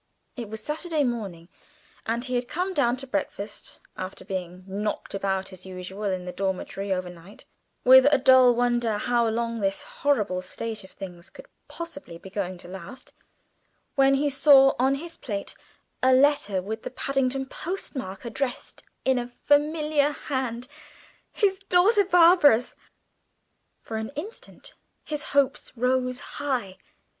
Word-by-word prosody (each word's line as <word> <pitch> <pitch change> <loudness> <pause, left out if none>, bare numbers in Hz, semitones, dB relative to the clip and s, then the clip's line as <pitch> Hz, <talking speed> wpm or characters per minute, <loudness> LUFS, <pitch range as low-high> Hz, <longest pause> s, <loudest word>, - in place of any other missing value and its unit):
It 235 -5 -6
was 220 0 -6
Saturday 310 +1 -1
morning, 200 -10 -3 0.6
and 235 +2 -1
he 255 - -4
had 245 0 0
come 365 +6 -2
down 250 -7 +2
to 265 +1 -6
breakfast, 200 -3 -4 0.2
after 185 +1 -7
being 185 -1 -5
knocked 205 +2 -4
about 195 -1 -2
as 185 -1 -11
usual 190 +2 -7
in 185 -2 -1
the 180 - -4
dormitory 195 +1 -3
over 185 -1 -1
night, 175 +4 -14 0.4
with 260 +1 +8
a 290 - +5
dull 255 -2 +6
wonder 240 -2 +1
how 235 +1 +1
long 230 +1 -1
this 195 -1 -1
horrible 210 -10 0
state 215 +4 -5
of 190 - -13
things 180 -3 -10
could - - -13 0.2
possibly 290 - -8
be 190 +2 -12
going 185 -2 -3
to 175 - -12
last, 190 +8 -10 0.8
when 275 -1 +4
he 285 +2 +1
saw 270 -1 +6
on 265 +2 +3
his 330 +4 -8
plate 200 -4 -4 0.5
a 260 - +4
letter 255 -9 +3
with 220 +3 -5
the - - -5
Paddington 270 0 -1
post 355 +6 -5
mark, 195 -5 -6
addressed 245 +2 -4 0.2
in 265 -1 +3
a 240 - -4
familiar 295 +2 +2
hand 255 -4 -3 0.6
his 390 -3 +1
daughter 395 +3 +4
Barbara's. 335 - +5 1.1
For 220 - -5
an 220 0 -4
instant 450 +7 -8 0.3
his 300 -1 -4 0.2
hopes 275 -1 +2
rose 250 +1 0
high. 250 -10 -3
245 Hz, 150 wpm, -26 LUFS, 195-285 Hz, 1.1 s, with